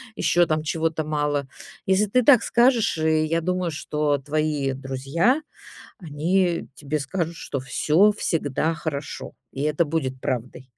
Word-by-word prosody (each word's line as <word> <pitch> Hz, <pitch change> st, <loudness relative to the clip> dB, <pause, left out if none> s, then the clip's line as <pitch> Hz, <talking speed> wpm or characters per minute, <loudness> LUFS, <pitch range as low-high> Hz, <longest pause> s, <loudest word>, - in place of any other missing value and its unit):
ещё 175 Hz, 0 st, +3 dB
там 155 Hz, -1 st, 0 dB
чего-то 160 Hz, 0 st, -1 dB
мало". 145 Hz, -2 st, -1 dB, 0.4 s
Если 190 Hz, +2 st, +3 dB
ты 250 Hz, +5 st, +2 dB
так 250 Hz, -4 st, +6 dB
скажешь, 235 Hz, -6 st, +3 dB
и 155 Hz, 0 st, +2 dB
я 165 Hz, +2 st, 0 dB
думаю, 180 Hz, 0 st, -1 dB
что 150 Hz, -1 st, -1 dB
твои 145 Hz, -1 st, -1 dB
друзья, 135 Hz, -, 0 dB, 0.6 s
они 170 Hz, +3 st, 0 dB
тебе 150 Hz, +1 st, -3 dB
скажут, 165 Hz, +4 st, -3 dB
что 140 Hz, -, -4 dB
всё 155 Hz, +9 st, +3 dB
всегда 160 Hz, -5 st, -1 dB
хорошо, 145 Hz, -3 st, -5 dB, 0.2 s
и 135 Hz, -, -6 dB
это 150 Hz, +2 st, +1 dB
будет 135 Hz, -4 st, -2 dB
правдой. 125 Hz, +1 st, -4 dB
155 Hz, 140 wpm, -24 LUFS, 145-175 Hz, 0.6 s, так